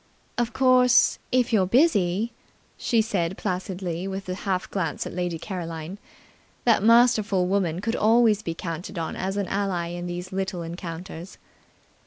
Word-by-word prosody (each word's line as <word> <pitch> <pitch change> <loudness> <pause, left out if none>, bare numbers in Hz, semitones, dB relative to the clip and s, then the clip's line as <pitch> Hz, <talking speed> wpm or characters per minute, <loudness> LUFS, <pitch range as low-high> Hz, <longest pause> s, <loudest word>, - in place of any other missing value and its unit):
"Of 240 -1 -1
course, 255 0 +4
if 250 -1 +2
you're 190 -4 +3
busy 225 - +2 0.2
" - - -36
she 230 -2 +2
said 190 -5 -1
placidly, 180 -1 -3
with 195 0 -5
a - - -1
half 185 -1 -2
glance 170 -6 -2
at - - -6
Lady 175 -1 -2
Caroline. 170 0 -6 0.7
That 230 -4 +4
masterful 225 -4 +4
woman 180 -3 0
could 225 +3 -1
always 220 -1 +4
be 165 -5 -4
counted 170 +2 -6
on 165 -1 -3
as 190 +2 -3
an 200 - 0
ally 190 -3 -1
in 175 0 -5
these 175 +1 -5
little 190 -2 -3
encounters. 170 +1 -7
190 Hz, 155 wpm, -25 LUFS, 175-220 Hz, 0.7 s, course